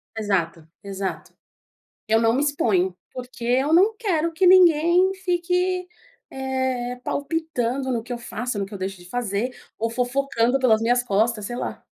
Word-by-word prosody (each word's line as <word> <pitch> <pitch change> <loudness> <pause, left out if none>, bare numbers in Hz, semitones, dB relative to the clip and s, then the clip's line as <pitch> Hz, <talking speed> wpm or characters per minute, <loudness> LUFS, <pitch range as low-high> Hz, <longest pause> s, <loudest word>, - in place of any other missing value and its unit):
Exato, 175 -7 -2 0.2
exato. 195 -1 -5 0.7
Eu 220 +1 +3
não 225 0 +3
me 275 +4 +1
exponho 190 -11 +1 0.2
porque 250 -1 -9
eu 260 +5 +2
não 400 +6 +5
quero 335 -8 0
que 370 +4 +2
ninguém 355 +1 +5
fique, 360 +1 0 0.4
eh, 260 -2 -2
palpitando 275 -4 -2
no 235 - -1
que 245 - -10
eu 240 - -4
faça, 240 0 -5
no 200 - -1
que 200 - -13
eu - - -5
deixo 190 0 -4
de 175 0 -15
fazer. 245 +1 -2 0.2
Ou 230 +1 -1
fofocando 250 +1 0
pelas 225 -4 +3
minhas 245 +1 +2
costas, 215 -1 0
sei 240 +3 -5
lá. - - -5
245 Hz, 160 wpm, -23 LUFS, 220-305 Hz, 0.7 s, não